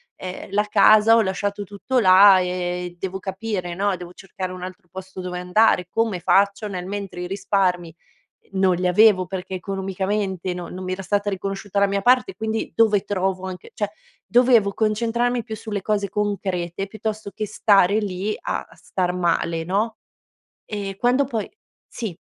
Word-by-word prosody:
Ehm, 185 0 -7
la 205 +1 +2
casa: 215 +2 +6
"Ho 230 - +5
lasciato 200 +1 -2
tutto 205 +6 -1
là, 190 -1 +7
e 180 -1 -3
devo 190 +1 -4
capire, 190 -2 -4
no, 200 +2 +1
devo 175 0 -10
cercare 185 -1 -6
un 180 -1 -8
altro 185 +1 -9
posto 190 0 -9
dove 180 0 -5
andare, 180 0 +3
come 225 -4 0
faccio?" 200 +4 +2
Nel 180 -2 -5
mentre 195 -2 -5
i 180 - -4
risparmi, 185 -2 0 0.5
ehm, 195 - -8
non 190 -1 +4
li 180 +1 -1
avevo 185 0 +5
perché 190 0 -6
economicamente 190 0 -2
no 175 -1 -6
non 185 - -7
mi 185 - -3
era 190 +1 -4
stata 205 +2 0
riconosciuta 195 +1 -4
la 200 - +5
mia 200 0 0
parte, 255 - +3
quindi: 220 0 -3
"Dove 220 -3 +4
trovo 190 -1 -1
anche" 185 -1 -8
cioè, 205 -3 -2 0.4
dovevo 240 -4 +4
concentrarmi 235 +3 0
più 220 -1 -7
sulle 210 -2 -5
cose 205 0 0
concrete, 195 -3 -2
piuttosto 215 0 -5
che 215 - -3
stare 205 -1 +4
lì 205 0 -2
a - - -3
star 180 -2 -2
male, 170 -2 0
no? 210 +6 -1 0.7
E 200 -2 -5
quando 245 +6 +2
poi 230 -6 -4 0.4
sì. 215 -8 -6
195 Hz, 165 wpm, -22 LUFS, 185-210 Hz, 0.7 s, là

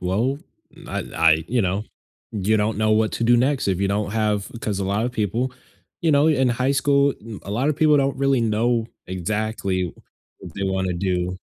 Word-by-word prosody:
well, 110 +10 0 0.4
n - - -13
I - - -2
I" 80 -1 +4
you 120 -1 +1
know, 95 +3 -1 0.5
you 105 +1 +1
don't 105 0 0
know 110 0 +2
what 110 0 +2
to 115 - -1
do 120 +1 +5
next 130 +3 +1
if 95 -1 0
you 100 - +1
don't 105 0 -1
have 105 -2 0
'Cause 105 -4 -2
a 100 - -1
lot 100 +4 0
of 125 - -4
people 115 +4 -1 0.5
you 160 -3 +3
know, 145 +2 +4
in 130 -4 +3
high 130 +3 0
school, 140 0 +3
mm, 110 -1 -10
a - - -8
lot 120 +8 0
of - - -1
people 150 -1 +4
don't 140 -1 +1
really 135 -2 +2
know 115 +1 +1 0.2
exactly 95 -1 -2 0.5
what 85 - -11
they 100 - -4
wanna 95 -1 0
do, 90 0 -1
110 Hz, 210 wpm, -22 LUFS, 95-125 Hz, 0.5 s, do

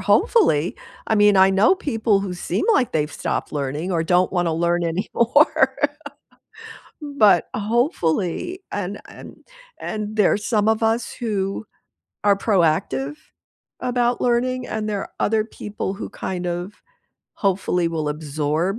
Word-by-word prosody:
hopefully 175 - +2 0.3
I 220 - +1
mean, 205 -1 +5
I 190 0 +6
know 195 - +4
people 225 - 0
who 190 -2 -4
seem 175 - -2
like 250 - +2
they've 150 -1 -1
stopped - - -3
learning 150 +5 -3
or 165 -1 +1
don't 180 +2 +2
wanna 175 -3 0
learn 170 +1 +1
anymore. 235 - +2 1.3
But 220 - +3
hopefully, 220 - -1
and 200 0 -4
and - - -12 0.4
and 215 0 -4
there 210 -3 +4
are - - +1
some 210 0 0
of 220 0 +1
us 225 +2 0
who 205 -3 -3 0.6
are 200 -1 +5
proactive 155 - +1 0.7
about 245 -1 0
learning, 250 +1 0
and 215 0 -3
there 205 -2 -2
are - - -8
other 220 0 +2
people 210 -3 -5
who 200 - -7
kind 180 -1 -4
of 175 +3 -4 0.6
hopefully 180 -3 0
will 155 -2 -2
absorb 155 +5 -2
200 Hz, 135 wpm, -22 LUFS, 170-225 Hz, 1.3 s, I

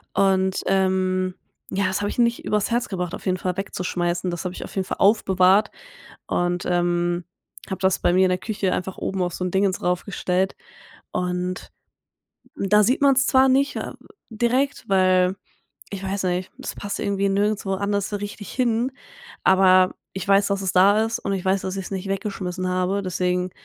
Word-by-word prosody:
Und, 190 -1 +2
ähm, 185 -1 +1 0.3
ja, 200 +1 0
das 190 +2 -1
habe 205 - -1
ich - - -6
nicht 235 -1 +2
über's 210 +1 0
Herz 240 +1 0
gebracht, 180 -3 -3
auf - - -7
jeden 185 0 +1
Fall 180 0 -2
wegzuschmeißen. 180 -2 -2
Das 175 - -4
habe 180 0 -4
ich - - -6
auf - - -12
jeden 190 -1 -1
Fall - - -4
aufbewahrt 195 0 +4 0.6
und, 175 0 -1
ähm, 175 0 0 0.4
habe 190 - -4
das 190 -1 +2
bei 175 - +2
mir 185 +1 +4
in 185 - +3
der 180 - +1
Küche 200 -1 -2
einfach 185 +1 -4
oben 190 -1 -3
auf 175 -1 -1
so 180 - -4
'n 180 - -2
Dingens 190 0 +1
rauf 180 0 0
gestellt. 190 -1 -1 0.6
Und 180 0 -3 0.9
da 210 +2 +3
sieht 250 +7 +1
man's 270 -2 +4
zwar 265 0 +5
nicht, 275 +2 +2
äh, - - -4 0.4
direkt, 245 +5 0
weil 185 -1 +3 0.6
ich 200 -2 -5
weiß 195 0 -2
nicht, 180 +1 -1
das - - -6
passt 205 0 -5
irgendwie 200 0 0
nirgendwo 200 0 0
anders 200 0 -1
so 210 - -3
richtig 205 0 -7
hin, 245 0 0 0.5
aber 185 -1 +5 0.2
ich 190 0 -5
weiß, 200 0 +4
dass 200 -1 -1
es 190 -1 -1
da 200 +4 +5
ist 225 0 -3
und 200 - -2
ich 190 -2 -3
weiß, 190 0 +2
dass 190 +1 -4
ich's 195 - -6
nicht 195 0 -4
weggeschmissen 190 -2 -3
habe, 185 +2 0
deswegen 180 0 -1
190 Hz, 190 wpm, -23 LUFS, 185-205 Hz, 0.9 s, zwar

